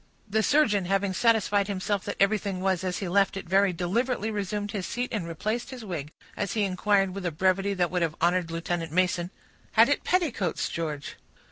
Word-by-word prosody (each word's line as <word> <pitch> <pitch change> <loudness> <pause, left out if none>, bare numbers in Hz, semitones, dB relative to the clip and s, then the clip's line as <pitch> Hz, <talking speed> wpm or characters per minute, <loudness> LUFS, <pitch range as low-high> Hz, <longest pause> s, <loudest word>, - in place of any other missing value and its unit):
The 220 +1 +1
surgeon, 220 -8 +3
having 195 +1 0
satisfied 205 -2 +2
himself 200 0 -2
that - - -4
everything 200 -1 +1
was 190 -1 0
as 185 -1 -1
he 200 - -4
had 175 - -4
left 195 0 +3
it, 195 - -7
very 195 +2 +4
deliberately 220 +6 -1
resumed 205 0 -3
his 200 -4 -3
seat 245 +1 -3
and 195 -7 -2
replaced 215 - -3
his 255 -4 -8
wig, 155 -6 -5 0.2
as 200 - -2
he 215 - +1
inquired, 195 0 +1
with 195 0 -5
a 175 - -1
brevity 190 +4 +1
that 175 -2 0
would 180 -1 0
have 165 -2 0
honored 175 0 +2
Lieutenant 165 -1 -3
Mason,— 175 0 +1 0.4
"Had - - +6
it - - +1
petticoats, 275 - 0
George?" 150 -4 -4
195 Hz, 200 wpm, -27 LUFS, 180-210 Hz, 0.4 s, Had